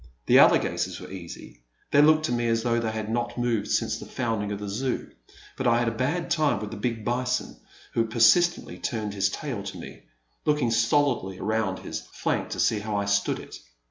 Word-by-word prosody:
The - - +6
alligators - - +3
were - - -10
easy; 85 -9 -10 0.3
they 145 - +6
looked 155 +1 +5
to - - -2
me 120 -1 0
as 115 0 +1
though 120 -1 +1
they 115 -1 -1
had 110 -1 -4
not 120 +2 -2
moved 115 -4 0
since - - 0
the - - -9
founding 110 -4 -2
of 100 - -2
the 105 0 -6
Zoo, 125 +6 -3 0.4
but 130 - -1
I 115 0 +4
had 120 0 +1
a - - +2
bad 145 +9 -2
time 155 - +2
with 105 0 -6
the 115 - -6
big 115 0 -3
bison, 125 +1 -1 0.4
who 115 - +2
persistently 115 +11 +3
turned 110 -4 -3
his 100 -1 +1
tail 120 0 -4
to 100 0 -7
me, - - -10 0.4
looking 150 -6 +1
stolidly 115 -4 +1
around 110 -2 -1
his - - -6
flank - - -1
to - - -5
see 110 - +2
how 105 0 -4
I 100 0 0
stood 100 0 +1
it. - - -10
115 Hz, 205 wpm, -26 LUFS, 105-125 Hz, 0.4 s, The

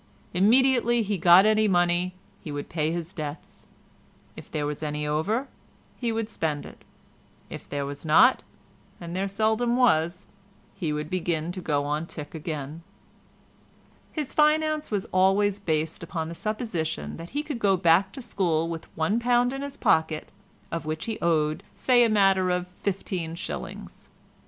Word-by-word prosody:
Immediately 240 +4 +4
he 200 -2 -2
got 175 +3 +7
any 215 0 +4
money 175 -1 +1 0.3
he 155 - -7
would 145 0 -5
pay 155 -1 0
his 170 +1 -4
debts; 150 -1 -7 0.7
if - - -11
there 150 -1 -2
was 150 0 -4
any 150 -1 -3
over 195 - 0 0.5
he 235 -2 -2
would 225 -1 -2
spend 155 -8 -3
it; - - -13 0.7
if - - -9
there 140 -1 -2
was 140 0 -7
not—and 170 -1 +1
there 195 +1 0
seldom 220 +4 +1
was—he 185 -4 -1
would 150 0 -3
begin 170 -2 -1
to 185 +1 -6
go 145 -4 0
on 150 +3 -2
tick 150 -3 -8
again. 155 -1 -5 1.3
His 300 -4 -4
finance 310 0 +2
was 205 -3 -1
always 195 +2 +3
based 160 -4 -1
upon 165 -2 -4
the - - -6
supposition 205 -5 -3
that 165 +1 -9
he 300 - -1
should 290 -6 -4
go 195 -3 +3
back 175 +2 +4
to 265 - -7
school 165 -7 0
with 165 -1 -6
£1 240 +9 +2
in 270 - -4
his 280 0 -6
pocket—of 160 +1 -1
which 155 0 -4
he 225 -1 -4
owed 155 -2 +1
say 245 -2 +4
a 230 - +3
matter 195 -3 +3
of 180 0 0 0.2
fifteen 185 -4 -3
shillings. - - -7
180 Hz, 150 wpm, -26 LUFS, 160-215 Hz, 1.3 s, got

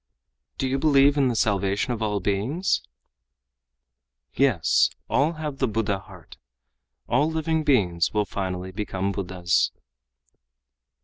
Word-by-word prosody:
"Do 135 - -1
you 135 +1 -1
believe 140 -1 +4
in 140 -2 +3
the 120 - 0
salvation 100 +2 0
of 115 - -6
all 105 -2 0
beings?" 105 - 0 1.5
"Yes, 120 -13 +3 0.2
all 150 +5 +2
have 150 -4 -6
the 130 - +2
Buddha 105 -3 -1
heart. 95 -6 -15 0.7
All 145 +6 +2
living 160 0 -1
beings 95 - +2
will 105 -1 0
finally 95 -2 -4
become 100 -1 -3
Buddhas." 90 -3 0
110 Hz, 120 wpm, -24 LUFS, 95-140 Hz, 1.5 s, believe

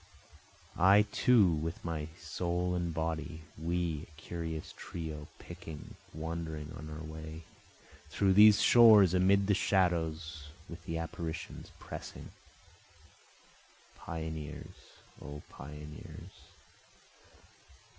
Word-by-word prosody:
I 100 +4 +7
too 120 -6 +5
with 80 +2 -3
my 80 -2 -3
soul 90 +2 -2
and 85 -1 -1
body, 80 0 -3
We, 85 -1 -2
a 75 -1 -18
curious 80 -1 -5
trio, 80 -3 -6
picking, 85 -3 -9 0.2
wandering 80 -1 -5
on 75 +4 -8
our 75 +1 -7
way, 80 +1 -8 0.7
Through 95 -1 +2
these 105 +1 +8
shores 110 -6 +8
amid 95 +2 +4
the 100 - +3
shadows, 85 -5 0 0.2
with 85 0 -10
the 80 - -3
apparitions 80 0 -5
pressing, - - -9 1.6
Pioneers! 80 -2 -6 0.5
O 75 0 -8
pioneers! 75 +2 -10
80 Hz, 95 wpm, -32 LUFS, 80-90 Hz, 1.6 s, these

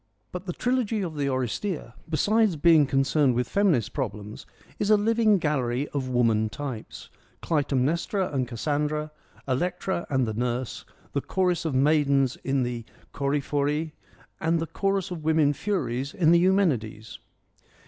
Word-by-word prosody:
' 105 - -45
But 180 +1 -7
the 175 - -2
trilogy 235 -3 0
of 165 -4 -5
the 145 -1 -1
Oresteia, 130 - -3 0.2
besides 205 +5 +2
being 155 -1 +5
con 135 0 +2
cerned 135 -2 +2
with 125 0 0
feminist 180 - +1
problems, 105 -5 -5 0.3
is 205 - 0
a 215 - +6
living 220 0 +3
gallery 140 -5 -1
of 135 -3 -3
woman 115 -3 +2
types: 130 -1 -7 0.3
Clytemnestra 155 +5 0
and 130 -3 0
Cassandra, 150 +5 -2 0.4
Electra 175 +6 -1
and 130 -3 +1
the 110 - -2
Nurse, 120 +2 -3 0.3
the 140 - 0
chorus 180 -1 0
of 155 -5 -1
maidens 140 -2 +3
in 135 -1 -1
the 120 -1 -3 0.3
Choephoroi, 145 +2 -1 0.5
and 165 +1 +1
the 165 - -1
chorus 195 +3 -1
of 165 -3 -5
women 155 -2 +3
furies 140 - -2
in 165 -5 +4
the 170 - +6
Eumenides. 145 - 0
145 Hz, 150 wpm, -26 LUFS, 130-180 Hz, 0.5 s, a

